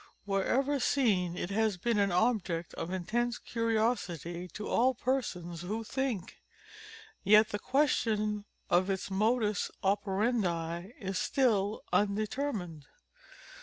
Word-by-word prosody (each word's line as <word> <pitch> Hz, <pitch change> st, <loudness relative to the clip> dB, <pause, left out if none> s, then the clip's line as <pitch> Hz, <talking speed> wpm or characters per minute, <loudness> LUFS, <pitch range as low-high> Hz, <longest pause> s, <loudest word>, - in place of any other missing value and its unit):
Wherever 260 Hz, +9 st, +1 dB
seen 195 Hz, -11 st, +1 dB
it 175 Hz, -, -3 dB
has 215 Hz, -1 st, +1 dB
been 230 Hz, +3 st, 0 dB
an 200 Hz, -1 st, +2 dB
object 180 Hz, -4 st, 0 dB
of 165 Hz, -, -5 dB
intense 230 Hz, +7 st, -1 dB
curiosity, 215 Hz, -, -1 dB
to 210 Hz, +5 st, -7 dB
all 255 Hz, +2 st, +3 dB
persons 180 Hz, -10 st, -2 dB
who 215 Hz, +6 st, -3 dB
think. 250 Hz, -6 st, -3 dB, 0.8 s
Yet 215 Hz, +1 st, +6 dB
the 205 Hz, -, -3 dB
question 215 Hz, -7 st, +1 dB, 0.2 s
of 185 Hz, +2 st, +3 dB
its 195 Hz, 0 st, -2 dB
modus 215 Hz, 0 st, +1 dB
operandi 190 Hz, -3 st, 0 dB
is 190 Hz, -4 st, -2 dB
still 215 Hz, -6 st, +1 dB
undetermined. 205 Hz, -, -1 dB
210 Hz, 110 wpm, -31 LUFS, 180-235 Hz, 0.8 s, Yet